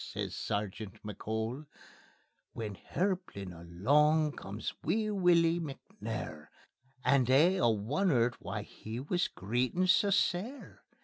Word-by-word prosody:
says - - -4
Sergeant 105 0 -3
McCole. 110 +6 -4 0.9
When 110 -3 -4
hirplin 175 - -3
alang 145 - +3
comes 100 +3 -5
wee 215 0 +1
Wullie 175 -3 +4
McNair, 135 - -6 0.6
And 130 -3 +4
they 155 +9 +5
a' 185 - +2
wonnert 120 - +2
why - - -4
he 110 +2 -7
wis 175 +7 0
greetin' 125 - 0
sae 195 +2 +5
sair. 195 +7 -1
135 Hz, 110 wpm, -32 LUFS, 110-180 Hz, 0.9 s, they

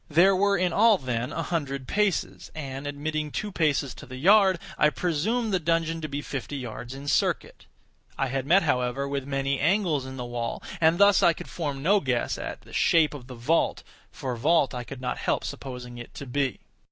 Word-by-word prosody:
There 175 +5 +5
were 200 +1 +3
in 180 -1 +1
all, 220 +2 +5
then, 125 -2 -3
a 165 - -3
hundred 140 -5 -3
paces; 210 -4 -1
and, 140 -2 -5
admitting 150 +1 -3
two 210 +7 -4
paces 150 -6 +1
to - - -12
the 130 - -8
yard, 190 +5 +5 0.2
I 150 - +4
presumed 200 +9 -1
the 185 - +3
dungeon 165 0 0
to 155 - -3
be 145 +1 -4
fifty 140 +1 -5
yards 125 0 -7
in 140 +1 -9
circuit. - - 0 0.5
I 135 - 0
had 135 +1 -2
met, 190 +4 +5
however, 125 -1 0
with 140 -1 -3
many 135 0 -1
angles 165 -5 +1
in 130 0 -8
the 125 - -4
wall, 120 -1 -4 0.2
and 165 +1 +4
thus 200 0 +6
I 170 - +5
could - - -10
form 145 -5 -4
no 200 +5 +4
guess 125 -7 -1
at - - -6
the - - -16
shape 155 -3 +3
of 130 -4 -9
the 130 - -9
vault, 125 +8 +1 0.3
for 130 -2 -4
vault 145 +4 +2
I 125 -1 -4
could 130 +1 -9
not 125 - -3
help - - 0
supposing 125 -2 -7
it 120 - -10
to 140 - -7
be. 135 0 -1
145 Hz, 205 wpm, -26 LUFS, 130-170 Hz, 0.5 s, thus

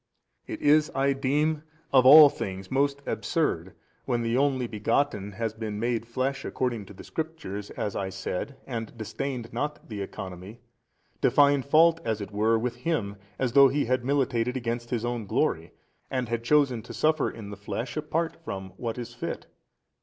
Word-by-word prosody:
It - - -6
is 150 +1 +4
(I 135 +1 +2
deem) 150 +3 +1 0.3
of 130 -1 +6
all 150 +2 +11
things 95 -7 -5
most 140 +1 +1
absurd, 95 - -1 0.3
when 120 -1 0
the 115 +1 0
Only 135 -2 +2
Begotten 105 -1 -1
has 110 +1 -2
been 110 -2 -5
made 115 0 -1
flesh 130 +3 -2
according 120 -6 -2
to - - -11
the - - -11
Scriptures 155 -11 -5
(as 105 - -4
I 95 -1 -2
said) 95 +7 -4
and 115 -2 -5
disdained 115 +2 -4
not 150 -3 -4
the 105 -3 -5
Economy, 95 +3 -7 0.6
to - - +4
find 145 -1 +4
fault 160 +4 +5
as 110 -2 -1
it 100 0 -6
were 110 +2 +2
with 120 +1 -2
Him 120 -8 -2 0.2
as 130 -3 0
though 140 0 +8
He 145 +2 0
had 130 +1 0
militated 125 -2 +1
against 120 -1 -3
His 120 -2 -1
own 120 -3 -3
glory - - 0 0.4
and 130 -2 -1
had 115 0 -2
chosen 135 -3 +3
to - - -10
suffer 155 -1 +2
in 105 -3 -9
the - - -6
flesh 100 +5 -5
apart 155 +2 -1
from 95 -8 -5
what 115 -1 -4
was 120 -2 -6
fit. - - -5
120 Hz, 175 wpm, -27 LUFS, 110-140 Hz, 0.6 s, all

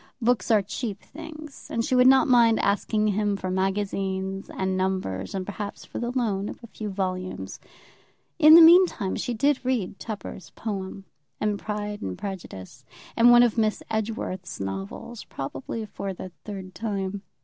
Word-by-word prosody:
Books 245 0 +1
are 215 -3 +4
cheap 205 +1 -4
things, 310 -1 -10
and 230 0 -1
she - - -1
would 250 0 +6
not 265 0 +6
mind 235 -3 +5
asking 210 +1 +1
him 205 0 0
for 185 -1 -4
magazines, 195 0 -2
and 190 0 -2
numbers, 185 - -2
and 190 -1 -3
perhaps 205 +1 -6
for - - -6
the 240 - -2
loan 220 -6 -1
of - - -7
a - - -9
few 215 -1 -6
volumes. 185 -1 -4 0.8
In 310 0 +9
the 335 - +11
meantime 335 - +6
she 245 - -2
did 280 +3 +2
read 245 -7 -1
Tupper's 205 -3 -7
poem, 195 -2 -5 0.3
and 210 -1 0
"Pride 210 -1 -4
and 95 -1 -4
Prejudice," 130 - -7 0.3
and 235 +1 +6
one 240 0 +8
of 235 -1 +2
Miss 215 -1 +1
Edgeworth's 215 -4 -3
novels, 95 - -5
probably 135 - -5
for 195 -2 -5
the 185 +1 -8
third 190 -3 -7
time. 195 -1 -3
205 Hz, 160 wpm, -26 LUFS, 190-230 Hz, 0.8 s, the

